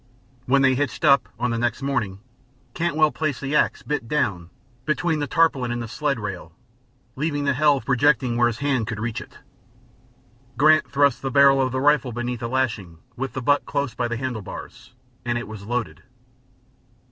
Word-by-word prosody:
When 135 +2 +4
they 130 -1 +5
hitched 145 +4 -2
up, 140 -2 +4
on 125 0 0
the 115 - -1
next 120 +2 -1
morning, 105 -8 -2 0.5
Cantwell 160 -3 +2
placed 155 -4 -2
the 135 +2 -3
ax, - - +1
bit 150 -6 -3
down, 95 - -1 0.3
between 155 +1 0
the 145 - -2
tarpaulin 135 -5 +2
and 120 - -2
the 115 - -5
sled 140 +2 -2
rail, 95 -6 -6 0.6
leaving 145 +1 -1
the 140 -1 +2
helve 145 0 +2
projecting 130 -2 +2
where 120 0 +4
his 115 -2 -3
hand 135 -6 0
could 110 -2 -4
reach 115 0 -3
it. - - -13 1.2
Grant 155 0 +4
thrust 140 -1 +2
the 135 - -2
barrel 140 0 +5
of 130 -1 0
the 130 - -1
rifle 145 -2 +3
beneath 120 +1 -4
a 115 - -2
lashing, 115 -9 -2 0.2
with 135 +2 -4
the 130 -2 -4
butt 145 +3 +2
close 140 -3 -2
by 120 - -1
the 120 0 -3
handle 125 -3 -3
bars, - - -10 0.3
and 120 0 -1
it 120 - -5
was 105 -2 -9
loaded. 120 0 -3
130 Hz, 185 wpm, -23 LUFS, 120-145 Hz, 1.2 s, they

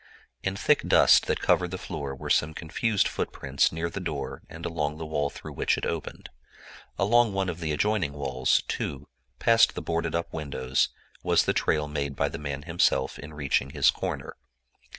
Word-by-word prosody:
In 95 0 -2
thick - - +3
dust - - +6
that - - 0
covered 90 -1 +2
the 95 - -4
floor 70 -6 -5
were - - -5
some 80 0 +2
confused 105 +6 0
footprints 70 0 0
near 80 +1 -2
the 85 +4 -5
door 80 -6 -4
and 85 +1 -8
along 75 -2 -2
the 80 - -5
wall 75 -2 -1
through - - -9
which - - +1
it - - -3
opened. 80 -2 -5 0.7
Along 115 +2 +3
one 95 -1 0
of 85 -1 -5
the 80 -2 -2
adjoining 85 0 0
walls, 65 -3 +1
too, 70 0 -4 0.3
past 115 0 +4
the - - -3
boarded 85 0 -1
up 85 - -3
windows 70 -4 0 0.3
was - - +3
the - - +2
trail 75 -1 +1
made 70 -1 -3
by 70 +2 +1
the 80 - -6
man 75 -1 -4
himself 80 -6 +1
in 75 +3 -9
reaching 70 -2 0
his 70 -1 +4
corner. - - -5
80 Hz, 185 wpm, -27 LUFS, 70-85 Hz, 0.7 s, dust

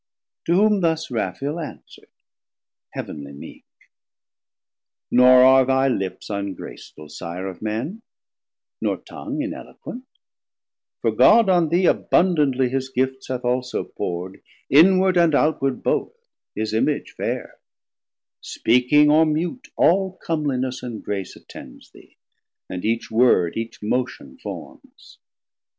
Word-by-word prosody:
To 170 - +3
whom 210 +1 +3
thus 160 -4 0
Raphael 135 - -3
answer'd 160 - -10 0.8
heav'nly 70 -1 -7
meek. 70 - -12 1.5
Nor 125 +1 +7
are 130 0 +7
thy 135 +1 +2
lips 95 -7 -3
ungraceful, 100 -6 -7
Sire 85 +4 -7
of 95 -2 -7
men, 115 - -4 0.8
Nor - - 0
tongue 295 0 -6
ineloquent; 290 -4 -8 0.9
for - - +1
God 230 -4 +5
on 175 -4 +3
thee 175 +3 +2
Abundantly 145 -10 +2
his 130 +1 -2
gifts 130 +1 -2
hath 125 -1 -4
also 125 0 -1
pour'd, 90 +2 -6 0.3
220 140 - +8
Inward 185 -1 +2
and 170 -3 +4
outward 135 -3 0
both, - - -1 0.4
his 110 0 -3
image 140 +7 0
faire: - - -5 0.8
Speaking 125 +6 +3
or 160 +1 +5
mute 170 - -2
all 190 +1 +3
comliness 130 -5 -2
and 120 -3 -7
grace 100 -2 -4
Attends - - -13
thee, - - -19 0.5
and 90 -1 -6
each 115 +1 -1
word, 110 -7 +3
each 115 0 -6
motion 125 +4 -3
formes. - - -11
130 Hz, 120 wpm, -22 LUFS, 115-165 Hz, 1.5 s, 220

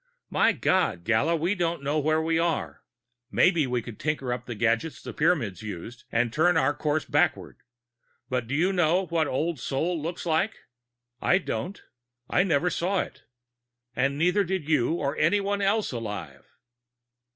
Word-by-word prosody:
My - - +4
God, 185 - +1
Gala, 130 - +2
we 170 +4 +1
don't 170 -5 -1
know 145 +2 +1
where 155 +2 +2
we 165 0 +1
are. 170 -1 -1 0.5
Maybe 170 -6 +3
we 125 -2 -1
could 120 -3 -9
tinker 145 -5 -1
up 125 0 -6
the 120 - -4
gadgets 115 +7 0
the - - -8
Pyramids 135 - +1
used 110 +3 -8
and 120 0 +1
turn 160 +3 +3
our 145 -2 +3
course 150 0 -1
backward - - 0 0.7
but 125 -2 -2
do 135 - -2
you 180 +6 +2
know 180 +1 +2
what 165 -3 0
Old 155 +3 -1
Sol 160 +7 -1
looks 170 +4 -5
like? 175 +6 +1 0.7
I 180 - +4
don't. 195 0 -4 0.4
I - - +3
never 180 -1 +2
saw 185 +3 0
it. - - -9 0.7
"And 140 +2 +1
neither 180 +6 +3
did 185 -4 -3
you 155 -3 +2
or 140 -3 -2
anyone 200 +5 +1
else 205 +2 +1
alive. 105 - -6
155 Hz, 160 wpm, -26 LUFS, 125-175 Hz, 0.7 s, My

